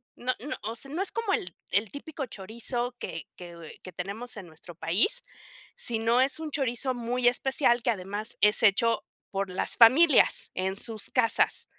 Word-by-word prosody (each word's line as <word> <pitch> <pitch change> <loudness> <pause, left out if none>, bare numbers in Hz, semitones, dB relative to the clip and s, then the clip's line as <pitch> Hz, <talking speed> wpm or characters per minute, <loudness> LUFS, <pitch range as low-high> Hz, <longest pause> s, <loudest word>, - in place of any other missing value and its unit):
no 255 +1 -2
no, 285 +7 -5
o 225 +2 -4
sea, 275 +4 -5
no 335 +5 -2
es 390 - -1
como 460 -4 -1
el 180 - -2 0.2
el 205 +1 +1
típico 285 0 -6
chorizo 235 +3 -4
que 165 - -6
que 170 -3 -11
que 185 - -9
tenemos 200 +8 -4
en 190 -4 -9
nuestro 165 +2 -13
país, 240 - +1 0.5
sino 230 +1 +1
es 270 +4 +1
un 320 -1 -5
chorizo 260 -2 -1
muy 245 +1 -1
especial 245 0 +2
que 240 - +2
además 205 +2 -3
es 210 +2 +4
hecho 225 +2 +3 0.3
por 195 0 -2
las 180 - -1
familias 265 +6 +6
en 190 +1 -2
sus 220 -1 -2
casas. 235 -3 +2
230 Hz, 175 wpm, -27 LUFS, 195-260 Hz, 0.5 s, familias